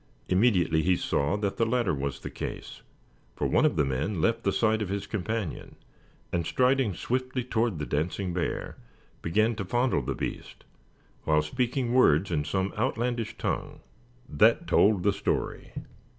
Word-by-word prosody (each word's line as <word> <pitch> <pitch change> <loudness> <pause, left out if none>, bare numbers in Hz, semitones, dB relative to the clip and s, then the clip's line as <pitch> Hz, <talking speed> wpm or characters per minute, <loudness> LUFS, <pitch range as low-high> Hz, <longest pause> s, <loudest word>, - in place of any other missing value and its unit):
Immediately 90 -5 +3
he 90 +2 +3
saw 75 +2 0
that 100 -2 -2
the - - +2
latter 115 -5 +1
was 70 -2 -3
the - - -6
case, - - -7 0.5
for - - -2
one - - +3
of - - -1
the 75 -3 +2
men 75 +9 -2
left 115 +8 +1
the 100 - +1
side 110 0 +1
of 105 - -2
his 100 0 -3
companion, 105 -3 -4 0.6
and 85 -1 +1
striding 130 -5 +2
swiftly 130 +4 -2
toward 115 -5 0
the 75 - -3
dancing 85 +6 -2
bear, 90 -1 -3 0.4
began 110 +7 +2
to 100 - -2
fondle 120 - +1
the - - -3
beast, - - -6 0.6
while 75 -1 +3
speaking 125 - -1
words 95 - +4
in 75 -3 +1
some 95 +6 -1
outlandish 120 -2 -1
tongue. - - -3 0.5
That 115 +10 +3
told 100 - +3
the 100 - +3
story. - - -2
100 Hz, 160 wpm, -27 LUFS, 85-120 Hz, 0.6 s, words